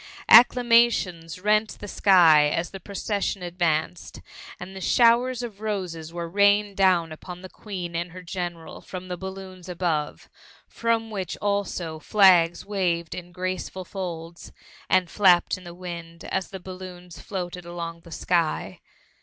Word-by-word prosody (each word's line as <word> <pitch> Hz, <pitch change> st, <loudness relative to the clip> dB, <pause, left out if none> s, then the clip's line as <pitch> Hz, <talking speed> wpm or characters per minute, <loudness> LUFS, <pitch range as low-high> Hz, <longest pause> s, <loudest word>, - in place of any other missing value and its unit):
Acclamations 230 Hz, -8 st, +5 dB
r^it 210 Hz, +3 st, +1 dB
the 205 Hz, -, -8 dB
sky 170 Hz, -7 st, +5 dB
as 165 Hz, +3 st, -2 dB
the 195 Hz, -, -8 dB
procession 200 Hz, 0 st, -3 dB
advanced, 170 Hz, -1 st, -2 dB, 0.4 s
and 190 Hz, +1 st, -8 dB
showers 245 Hz, +1 st, +3 dB
of 215 Hz, -4 st, -8 dB
roses 180 Hz, -7 st, -4 dB
were 170 Hz, 0 st, -5 dB
rained 205 Hz, +2 st, +3 dB
down 180 Hz, -4 st, +3 dB
upon 180 Hz, +3 st, -9 dB
the 185 Hz, -, -10 dB
Queen 180 Hz, -5 st, -7 dB
and 170 Hz, +1 st, -3 dB
her 185 Hz, +1 st, -10 dB
Gfeneral 175 Hz, -2 st, -6 dB
from 185 Hz, 0 st, -8 dB
the 180 Hz, -, -3 dB
balloons 190 Hz, -1 st, -9 dB
above; 170 Hz, -4 st, -2 dB, 0.4 s
from 230 Hz, -1 st, -1 dB
which, 190 Hz, -4 st, -4 dB
also, 195 Hz, -6 st, -2 dB
flags 175 Hz, -2 st, +4 dB
waved 175 Hz, -5 st, -1 dB
in 175 Hz, -1 st, -8 dB
graceful 185 Hz, +1 st, -4 dB
folds, 170 Hz, -3 st, -7 dB, 0.4 s
md 185 Hz, -1 st, +3 dB
flapped 180 Hz, -2 st, +4 dB
in 185 Hz, -, -13 dB
the 175 Hz, 0 st, -9 dB
wind, 170 Hz, -2 st, -8 dB
as 190 Hz, -1 st, -2 dB
the 190 Hz, -, -7 dB
balloons 180 Hz, -1 st, -10 dB
floated 180 Hz, -3 st, -5 dB
along 170 Hz, -1 st, -6 dB
the 165 Hz, 0 st, -16 dB
sky. 170 Hz, -1 st, -1 dB
180 Hz, 140 wpm, -25 LUFS, 170-200 Hz, 0.4 s, Acclamations